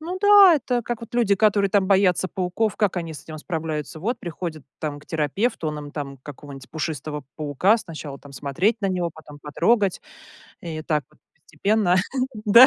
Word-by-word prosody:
Ну 350 +4 -4
да, 405 -3 +8
это 250 -4 -1
как 240 -1 -4
вот 230 0 -10
люди, 225 -5 +3
которые 200 -2 +3
там 200 -1 +3
боятся 190 -2 +3
пауков, 190 +4 -1
как 200 -4 +1
они 165 -2 -3
с - - -9
этим 155 -1 -9
справляются. 155 -2 -4
Вот 230 +7 -1
приходят 165 -3 -6
там 145 -2 -4
к 145 - -18
терапевту, 160 - -1
он 150 0 -4
им 145 -1 -8
там 140 -3 -5
какого-нибудь 140 -1 -10
пушистого 150 -2 -4
паука, 155 - +2
сначала 155 -7 -8
там 140 0 -14
смотреть 165 - 0
на 200 - 0
него, 180 -2 -1
потом 150 -2 -13
потрогать, 190 +6 +1 0.6
и 160 -2 -5
так 150 -3 0
вот - - -26 0.3
постепенно. 190 +3 +2 0.5
Да. 230 +5 +9
175 Hz, 180 wpm, -23 LUFS, 150-210 Hz, 0.6 s, Да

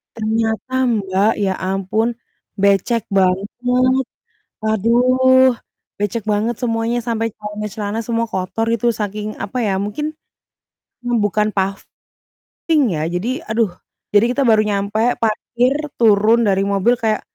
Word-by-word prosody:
Ternyata 220 +2 -2
Mbak 200 -1 +1
ya 190 -2 +1
ampun, 195 +5 -1 0.5
becek 200 +3 +2
banget, 195 +1 +1 1.2
aduh 255 +4 +4 0.5
becek 205 +1 -1
banget 215 +3 0
semuanya 230 0 0
sampai 225 -1 -1
celana-celana 210 0 -4
semua 230 -1 0
kotor 190 +3 -2
gitu 235 +1 +1
saking 210 0 -4
apa 245 +5 -3
ya, 195 -2 0
mungkin, 295 +10 -3 0.9
mmm, 240 -1 +1
bukan 210 +1 +1
paving 195 0 -4 0.9
ya, 155 - -1
jadi 240 - -2
aduh. 220 -3 +1 0.4
Jadi 225 +4 +4
kita 280 - -2
baru 215 -1 +5
nyampe 210 +3 0
parkir, 240 +4 +1 0.2
turun 220 +1 +5
dari 195 0 +2
mobil 200 +5 +2
kayak, 220 -2 0
215 Hz, 120 wpm, -19 LUFS, 200-235 Hz, 1.2 s, baru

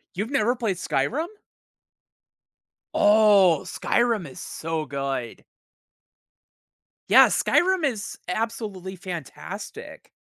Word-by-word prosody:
You've 210 +7 -3
never 245 -3 +2
played 225 -7 -2
Skyrim? 240 - -1 1.7
Oh, 205 -6 +5
Skyrim 230 -7 0
is 130 - -11
so 160 -1 -4
good. 135 -4 -4 1.7
Yeah, - - +8
Skyrim 375 -1 +2
is 225 -7 -3
absolutely 200 -2 -4
fantastic. 175 -5 -8
200 Hz, 80 wpm, -24 LUFS, 165-230 Hz, 1.7 s, Yeah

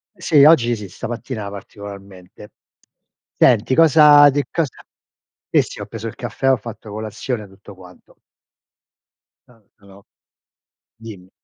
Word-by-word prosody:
Sì, 165 -6 +3
oggi 125 -6 +4
sì, 105 -4 -10
stamattina 115 +1 -7
particolarmente. 100 -1 -12 0.9
Senti, 125 0 +3
cosa 150 -2 +6
di 145 +1 -1
cosa 155 -7 -2 0.7
sì, - - +3
sì, - - -9
ho - - -6
preso - - -8
il - - -8
caffè, 135 0 -2
ho 130 - +2
fatto 115 -2 -11
colazione 110 +2 -5
e - - -13
tutto 100 +1 -16
quanto. 90 -1 -18 1.3
Tan 115 -4 -25
però 100 0 -19 1.0
dimmi. 100 -5 -13
110 Hz, 125 wpm, -19 LUFS, 100-135 Hz, 1.3 s, cosa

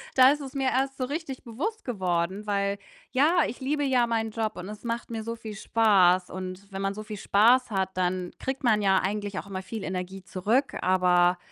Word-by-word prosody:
Da 260 +1 +8
ist 295 0 -2
es 270 0 -8
mir 270 -1 +1
erst 270 +1 0
so 255 - -1
richtig 285 -2 -5
bewusst 330 - -4
geworden, 190 -2 -1
weil 200 -1 0 0.3
ja, 305 +5 +4
ich 245 - -7
liebe 290 +2 0
ja 255 -3 +3
meinen 225 -1 -1
Job 220 -1 -2
und 180 +2 -6
es 210 +2 -9
macht 235 0 -3
mir 220 -1 -4
so 230 +1 -4
viel 220 -2 -8
Spaß 195 -5 +3
und 185 +2 -7
wenn 195 0 -5
man 195 0 -1
so 215 +1 -7
viel 210 -1 -7
Spaß 230 +6 +4
hat, 190 -1 0
dann 180 0 -1
kriegt 265 +1 -4
man 215 -3 +3
ja 190 -1 +4
eigentlich 205 0 -2
auch - - -9
immer 190 -1 -5
viel 220 +1 -6
Energie 185 +1 -5
zurück, 220 +9 0
aber 180 -1 +3
210 Hz, 215 wpm, -27 LUFS, 190-255 Hz, 0.3 s, Da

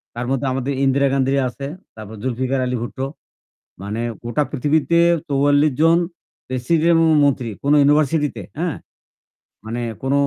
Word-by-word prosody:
তার 120 - -3
মধ্যে 135 0 -1
আমাদের 135 +1 -2
'ইন্দিরা 140 +1 +3
গান্ধী' 135 0 +1
আছে, 140 +3 -7 0.3
তারপর 110 0 -9
'জুলফিকার 130 +2 -1
আলী 125 0 -1
ভুটো'। 130 +2 -4 0.8
মানে 105 +3 -4 0.2
গোটা 120 +6 0
পৃথিবীতে 150 +4 +1 0.3
৪৪ 145 +2 +3
জন 165 +1 +5 0.5
প্রেসিডেন্ট 155 +7 +1
এবং 165 0 +4 0.2
মন্ত্রী 130 -4 +1 0.2
কোন 140 - +3
ইউনিভার্সিটিতে, 150 +1 +2 0.2
হ্যাঁ? 170 -1 -1 0.9
মানে 120 +2 -4 0.2
কোন 135 +1 0
135 Hz, 135 wpm, -20 LUFS, 125-150 Hz, 0.9 s, জন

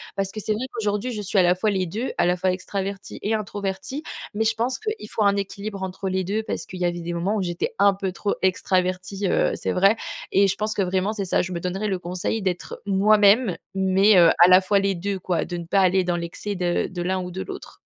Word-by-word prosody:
Parce 195 -1 -2
que 215 - -6
c'est 215 +1 -1
vrai 225 +5 -3
qu'aujourd'hui 210 +2 -1
je 210 -2 -4
suis 200 +1 -1
à 185 - +6
la 175 - +5
fois 210 +4 0
les 190 -2 0
2- 220 +10 -3
à - - +3
la 180 +1 +3
fois 185 +1 +1
extravertie 195 +1 -5
et 220 +2 0
introvertie- 200 +5 -4 0.3
mais 220 +2 0
je 225 0 +2
pense 240 - -1
qu'il 430 - -4
faut 220 - -2
un 200 -1 +4
équilibre 200 0 -4
entre 190 +1 -4
les 185 0 0
2 205 +4 -1
parce 220 - -4
qu'il 185 - -9
y 180 - +1
avait 175 0 -1
des 170 +1 -4
moments 180 +5 -1
où 200 - 0
j'étais 175 -1 -3
un 200 0 +5
peu 190 -1 -3
trop 200 +2 -2
extravertie, 185 0 0
heu, - - +2
c'est - - -2
vrai 195 +4 +4 0.4
et 200 0 +4
je 190 - 0
pense 215 0 -2
que 200 - -1
vraiment 190 +3 0
c'est 205 -2 -3
ça: 180 - +1
je 185 - -5
me 170 - -3
donnerai 190 +4 -2
le 190 -2 -1
conseil 180 +5 -3
d'être 185 -2 -3
moi-même 205 +1 +4 0.2
mais, 190 +1 +4
heu, 170 -2 +7
à - - +9
la 185 +1 +8
fois 195 +1 +2
les 195 -1 0
2 195 +2 -3
quoi, 180 -1 -1
de 175 - -5
ne 170 - -6
pas 195 +2 +3
aller 185 0 +3
dans 175 -1 0
l'excès 175 +4 -4
de 175 -1 0
de 180 -2 -6
l'un 185 +1 0
ou 180 - -5
de 190 +2 -5
l'autre. - - -9
195 Hz, 260 wpm, -23 LUFS, 180-205 Hz, 0.4 s, à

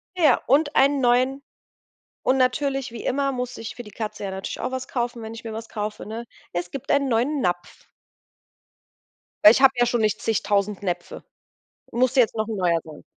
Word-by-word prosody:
Ja, 310 -8 +4
und 290 +3 +3
einen 280 +1 +4
neuen 255 +3 +2 0.8
und 260 - +2
natürlich, 270 +1 +1
wie 230 -1 -8
immer, 275 +1 0
musste 250 -2 -4
ich 225 - -6
für 245 - -7
die 210 - -12
Katze 210 0 -5
ja 195 - -3
natürlich 190 0 -5
auch - - -2
was 260 0 -4
kaufen, 240 -1 -2
wenn 220 0 -7
ich 230 - -10
mir 225 - -5
was 225 +1 -7
kaufe, 210 -1 -4
ne? 225 +2 -6 0.3
Es 175 0 -3
gibt 270 - -7
einen 280 -1 +3
neuen 260 +5 +1
Napf. 175 0 -3 1.6
Weil 210 - +11
ich 245 - +2
habe 270 -1 +7
ja 245 - +4
schon 240 -1 0
nicht 215 -2 +1
zigtausend 205 -2 0
Näpfe. 175 -2 -4 0.6
Und 240 - -5
musste 255 +1 +4
jetzt 235 - +3
noch 215 0 -1
'n 220 - -3
neuer 175 -3 +2
sein. 155 -2 -12
235 Hz, 200 wpm, -24 LUFS, 210-260 Hz, 1.6 s, Weil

